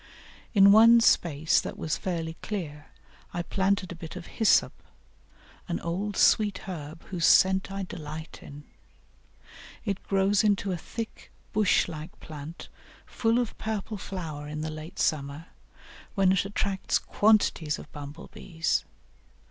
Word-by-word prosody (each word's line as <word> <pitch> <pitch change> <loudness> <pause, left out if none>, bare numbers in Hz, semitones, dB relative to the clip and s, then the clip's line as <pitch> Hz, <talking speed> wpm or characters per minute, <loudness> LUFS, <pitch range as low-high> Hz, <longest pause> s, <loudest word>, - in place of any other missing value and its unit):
In 200 0 +8
one 230 +3 +8
space 160 -8 +3
that - - -7
was 155 - -1
fairly 165 -3 -3
clear 155 -8 -5 0.5
I 175 - -1
planted 190 0 0
a - - -6
bit 165 0 -9
of 180 -2 -7
Hyssop, 220 -3 +3 0.9
an 170 - -2
old 190 +5 -3
sweet 210 -2 +3
herb 160 -3 -7
whose 175 -3 +1
scent 190 +1 +4
I 195 0 -3
delight 155 -2 -8
in; 145 +1 -11 1.2
it 200 -2 -2
grows 195 +1 +2
into 200 -2 +1
a - - 0
thick 225 +6 -7 0.2
bush 210 -2 +3
like 160 0 -8
plant 155 +1 -9 0.4
full 225 0 +1
of 245 -2 -1
purple 215 -1 -3
flower 160 -7 -6
in 150 +1 -5
the 155 0 -3
late 155 +2 -9
summer, 145 +1 -1 0.7
when 195 -2 +4
it 190 0 +2
attracts 200 -1 -1
quantities 205 -8 +2
of - - -12
bumble 145 +1 -9
bees. 165 -3 -1
180 Hz, 140 wpm, -27 LUFS, 155-200 Hz, 1.2 s, In